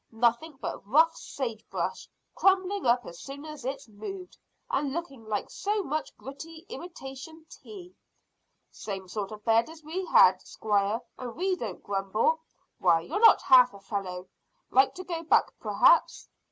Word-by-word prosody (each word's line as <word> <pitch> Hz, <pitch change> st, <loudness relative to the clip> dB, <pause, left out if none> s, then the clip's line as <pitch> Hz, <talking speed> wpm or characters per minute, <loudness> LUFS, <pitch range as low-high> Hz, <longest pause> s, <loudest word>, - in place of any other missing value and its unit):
Nothing 235 Hz, +6 st, 0 dB
but -, -, -5 dB
rough 320 Hz, +8 st, +4 dB
sage 230 Hz, -6 st, -5 dB
brush, -, -, -3 dB, 0.2 s
crumbling 385 Hz, -3 st, +2 dB
up 240 Hz, 0 st, +3 dB
as 170 Hz, -, -10 dB
soon 280 Hz, +2 st, -9 dB
as 305 Hz, -1 st, -9 dB
it's 265 Hz, 0 st, -5 dB
moved, 355 Hz, -, -8 dB, 0.3 s
and 295 Hz, -, -1 dB
looking 275 Hz, -8 st, -6 dB
like 215 Hz, -1 st, -3 dB
so 415 Hz, 0 st, -1 dB
much 310 Hz, -1 st, -4 dB
gritty 320 Hz, +5 st, -10 dB
imitation 320 Hz, -, -9 dB
tea." 370 Hz, -4 st, -12 dB, 0.8 s
"Same 195 Hz, -3 st, -6 dB
sort 200 Hz, +2 st, -4 dB
of 210 Hz, -1 st, -10 dB
bed 225 Hz, +4 st, +3 dB
as 320 Hz, -1 st, -13 dB
we 335 Hz, +5 st, -4 dB
had, 185 Hz, -, +6 dB
squire, 205 Hz, +1 st, -1 dB, 0.2 s
and 245 Hz, -2 st, -6 dB
we 375 Hz, +2 st, 0 dB
don't 220 Hz, -, -6 dB
grumble. 200 Hz, +10 st, 0 dB, 0.4 s
Why, 170 Hz, -2 st, +4 dB
you're 175 Hz, -, -3 dB
not 455 Hz, 0 st, +7 dB
half 250 Hz, -4 st, +6 dB
a -, -, -11 dB
fellow. 190 Hz, -2 st, -5 dB, 0.4 s
Like 265 Hz, +1 st, +4 dB
to 370 Hz, -, -7 dB
go 340 Hz, -3 st, -4 dB
back 330 Hz, -, +3 dB
perhaps?" -, -, +3 dB
270 Hz, 155 wpm, -28 LUFS, 215-330 Hz, 0.8 s, not